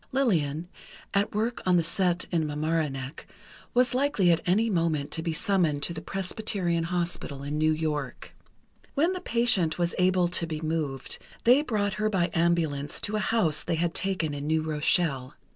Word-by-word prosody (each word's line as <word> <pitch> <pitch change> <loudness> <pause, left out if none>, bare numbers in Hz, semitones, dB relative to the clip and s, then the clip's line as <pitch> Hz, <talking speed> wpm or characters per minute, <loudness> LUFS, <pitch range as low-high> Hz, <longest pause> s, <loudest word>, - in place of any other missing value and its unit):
Lillian, 170 - 0 0.5
at 200 +1 +1
work 225 +3 -1
on 180 -1 +3
the 170 - +2
set 175 +1 +1
in 165 -3 +1
Mamaroneck, 150 -2 -2 0.5
was 250 +1 +3
likely 255 -9 +2
at 165 - +2
any 210 +6 +3
moment 165 -7 0
to 165 - -1
be 165 0 -2
summoned 160 -4 +1
to 170 - 0
the 160 - -6
Presbyterian 185 -3 -2
Hospital 170 -5 -3
in 145 +2 -3
New 155 0 +3
York. 150 -4 -3 0.6
When 325 +6 +2
the 365 - -5
patient 230 -9 +2
was 175 -1 0
able 180 -1 +3
to 170 -1 0
be 155 -2 -4
moved, 155 -4 -3 0.2
they 250 +5 +6
brought 210 -8 -1
her 215 - +2
by 180 -4 0
ambulance 165 -4 +1
to 210 - -1
a - - +1
house 195 -9 +2
they - - -1
had 165 +1 0
taken 185 -6 -1
in 145 0 -5
New 160 0 +1
Rochelle. 150 -3 +1
170 Hz, 175 wpm, -27 LUFS, 155-195 Hz, 0.6 s, they